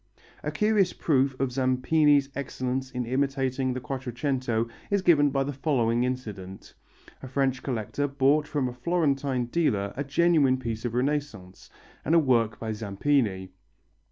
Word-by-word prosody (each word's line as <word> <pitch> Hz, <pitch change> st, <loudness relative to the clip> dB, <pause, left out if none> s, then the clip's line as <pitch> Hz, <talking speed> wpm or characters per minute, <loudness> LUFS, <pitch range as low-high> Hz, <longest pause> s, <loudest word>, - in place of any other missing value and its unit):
A -, -, -3 dB
curious 210 Hz, -4 st, +2 dB
proof 135 Hz, -3 st, +1 dB
of 135 Hz, -1 st, 0 dB
Zampini's 135 Hz, +3 st, +2 dB
excellence 130 Hz, -1 st, -3 dB
in 125 Hz, -1 st, -4 dB
imitating 130 Hz, 0 st, 0 dB
the 130 Hz, -, -3 dB
Quattrocento 125 Hz, -2 st, -2 dB, 0.2 s
is 200 Hz, -2 st, +1 dB
given 145 Hz, -5 st, +5 dB
by 135 Hz, 0 st, 0 dB
the 145 Hz, +1 st, -4 dB
following 125 Hz, -4 st, +1 dB
incident. 105 Hz, -7 st, -6 dB, 0.5 s
A 130 Hz, -, -8 dB
French 130 Hz, 0 st, 0 dB
collector 130 Hz, +3 st, -2 dB
bought 140 Hz, +2 st, +2 dB
from 140 Hz, -4 st, -1 dB
a 125 Hz, -, -5 dB
Florentine 140 Hz, -3 st, 0 dB
dealer 120 Hz, -8 st, 0 dB
a 140 Hz, -, -2 dB
genuine 145 Hz, -2 st, +3 dB
piece 115 Hz, -2 st, -5 dB
of 120 Hz, -1 st, -3 dB
Renaissance, 125 Hz, -8 st, -3 dB, 0.3 s
and 165 Hz, -, +2 dB
a -, -, +7 dB
work 120 Hz, -7 st, +1 dB
by 110 Hz, -1 st, -4 dB
Zampini. 105 Hz, -2 st, -1 dB
130 Hz, 145 wpm, -27 LUFS, 120-145 Hz, 0.5 s, a